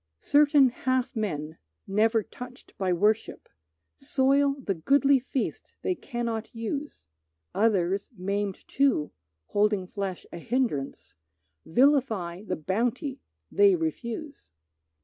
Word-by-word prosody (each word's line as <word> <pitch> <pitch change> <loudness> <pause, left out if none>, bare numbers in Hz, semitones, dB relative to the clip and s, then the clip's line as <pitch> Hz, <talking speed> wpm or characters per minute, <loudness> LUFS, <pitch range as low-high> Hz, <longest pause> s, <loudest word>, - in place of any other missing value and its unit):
Certain 285 - +5
half 255 +1 -1
men, 160 -8 -3 0.3
never 220 +2 +2
touched 250 +3 -11
by 190 -2 +1
worship, 210 +5 0 0.5
Soil 275 - +2
the 210 -7 -1
goodly 275 - +3
feast 260 +1 -4
they 370 - +1
cannot 235 -8 -4
use; 280 +6 -5 0.5
Others, 195 -2 +1
maimed 200 +1 -3
too, 270 - +1 0.4
holding 205 -2 +2
flesh 190 -1 -5
a 170 - -6
hindrance, 230 - -2 0.5
Vilify 220 - +2
the 195 -3 -3
bounty 245 - -2 0.3
they 405 -2 +5
refuse. 310 - -5
230 Hz, 105 wpm, -27 LUFS, 195-270 Hz, 0.5 s, Certain